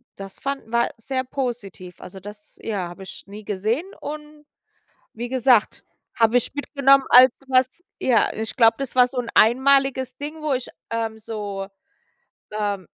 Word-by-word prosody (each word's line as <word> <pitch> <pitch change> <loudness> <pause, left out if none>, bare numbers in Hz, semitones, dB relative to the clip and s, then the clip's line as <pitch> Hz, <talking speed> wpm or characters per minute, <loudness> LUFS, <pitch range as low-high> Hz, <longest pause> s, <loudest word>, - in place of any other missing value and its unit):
das 195 -1 -10
fanden 275 -4 -4
wir 235 0 +1
sehr 260 +3 -3
positiv. 230 -9 -5
Also, 190 +1 -10
das, 210 +1 -11
ja, 200 -6 -3
habe 185 +2 -11
ich - - -10
nie 210 +2 -10
gesehen. 215 - -1 0.2
Und 300 0 -8 0.7
wie 240 +1 -4
gesagt, 250 -3 +2 0.3
habe 230 +1 +4
ich 245 - -1
mitgenommen 275 -2 +3
als 250 +1 +8 0.2
was, 260 +6 +2 0.2
ja, 245 -4 +2
ich 220 0 -4
glaube, 225 -3 +5
das 270 -2 -4
war 250 -1 +6
so 250 +1 -8
'n 240 -1 -4
einmaliges 260 +2 +3
Ding, 300 +2 -7
wo 300 -3 0
ich, 255 -1 -3 0.2
ähm, 225 -1 -2
so, 205 -3 -5 0.9
ähm 205 -4 -2
240 Hz, 155 wpm, -23 LUFS, 210-270 Hz, 0.9 s, als